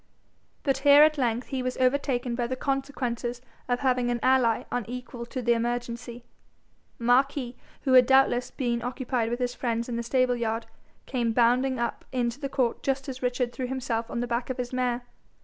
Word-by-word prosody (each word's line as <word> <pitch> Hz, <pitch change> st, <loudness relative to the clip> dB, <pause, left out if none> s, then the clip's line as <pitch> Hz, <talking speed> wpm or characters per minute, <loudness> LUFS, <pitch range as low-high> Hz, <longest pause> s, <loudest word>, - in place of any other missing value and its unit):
But 270 Hz, -2 st, +1 dB
here 285 Hz, +1 st, +8 dB
at 305 Hz, -1 st, +3 dB
length 240 Hz, -1 st, 0 dB
he 265 Hz, -1 st, -2 dB
was 255 Hz, 0 st, -3 dB
overtaken 255 Hz, -2 st, +1 dB
by 240 Hz, 0 st, -1 dB
the 255 Hz, -, -2 dB
consequences 255 Hz, -3 st, -2 dB, 0.3 s
of 245 Hz, 0 st, 0 dB
having 250 Hz, -2 st, +2 dB
an 240 Hz, 0 st, 0 dB
ally 255 Hz, -3 st, +3 dB
unequal 245 Hz, +1 st, -5 dB
to 255 Hz, 0 st, -5 dB
the 240 Hz, 0 st, +4 dB
emergency. 235 Hz, 0 st, -3 dB, 0.7 s
Marquis, 250 Hz, +1 st, +2 dB, 0.3 s
who 265 Hz, -, +2 dB
had 250 Hz, -1 st, +7 dB
doubtless 265 Hz, -2 st, +4 dB
been 240 Hz, -3 st, -2 dB
occupied 245 Hz, -1 st, -2 dB
with 240 Hz, -, -1 dB
his 245 Hz, -1 st, -1 dB
friends 235 Hz, -2 st, -2 dB
in 240 Hz, -2 st, -3 dB
the -, -, -1 dB
stable 250 Hz, +1 st, +2 dB
yard, 225 Hz, -1 st, -2 dB, 0.4 s
came 240 Hz, -3 st, -1 dB
bounding 250 Hz, +3 st, +3 dB
up 235 Hz, 0 st, -2 dB
into 245 Hz, 0 st, -1 dB
the 275 Hz, -2 st, -3 dB
court 255 Hz, -4 st, 0 dB
just 270 Hz, 0 st, -1 dB
as 260 Hz, -1 st, -6 dB
Richard 250 Hz, -1 st, -1 dB
threw 255 Hz, -2 st, -3 dB
himself 245 Hz, -3 st, -2 dB
on 235 Hz, -, -2 dB
the -, -, 0 dB
back 240 Hz, +1 st, -2 dB
of 260 Hz, -, -3 dB
his 250 Hz, 0 st, -4 dB
mare. 250 Hz, -1 st, 0 dB
245 Hz, 185 wpm, -27 LUFS, 235-260 Hz, 0.7 s, here